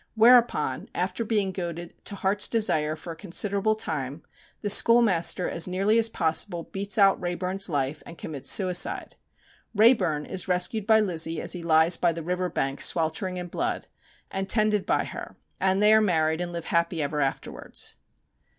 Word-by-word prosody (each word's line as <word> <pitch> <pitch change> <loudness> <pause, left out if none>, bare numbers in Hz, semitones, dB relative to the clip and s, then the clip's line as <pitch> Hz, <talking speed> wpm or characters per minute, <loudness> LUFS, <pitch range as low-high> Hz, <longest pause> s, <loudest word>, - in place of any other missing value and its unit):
Whereupon, 230 - +3
after 185 +5 -2
being 210 -4 -1
goaded 175 -2 -6
to 200 - -4
heart's 200 +1 +1
desire 155 -9 0
for 165 +1 -9
a - - -13
considerable 200 +4 0
time, 150 -8 -4 0.4
the 205 - -1
schoolmaster 205 -6 +4
as 170 - 0
nearly 195 +5 +1
as 225 0 +3
possible 170 -1 0
beats 200 +3 -4
out 195 -2 +4
Wrayburn's 180 +2 -2
life, 145 -1 -2
and 170 - -12
commits 145 -4 -6
suicide. 180 -3 +2 0.6
Wrayburn 210 - +3
is 190 0 -5
rescued 185 +4 -1
by 220 -1 +5
Lizzie 165 -5 -1
as - - -1
he 180 - -6
lies 165 +1 +3
by 175 -1 +1
the 165 0 -7
river 180 +2 -2
bank 135 -3 -3
sweltering 180 +3 0
in 180 - -5
blood, 350 - -3 0.5
and 195 0 -4
tended 215 -1 +1
by - - +1
her, - - -9 0.2
and 190 +1 +1
they 210 +1 +6
are 220 - +5
married 160 -4 0
and 175 0 -4
live 170 -1 -6
happy 170 0 0
ever 145 +1 -2
afterwards. 135 -1 -4
180 Hz, 170 wpm, -25 LUFS, 165-205 Hz, 0.6 s, they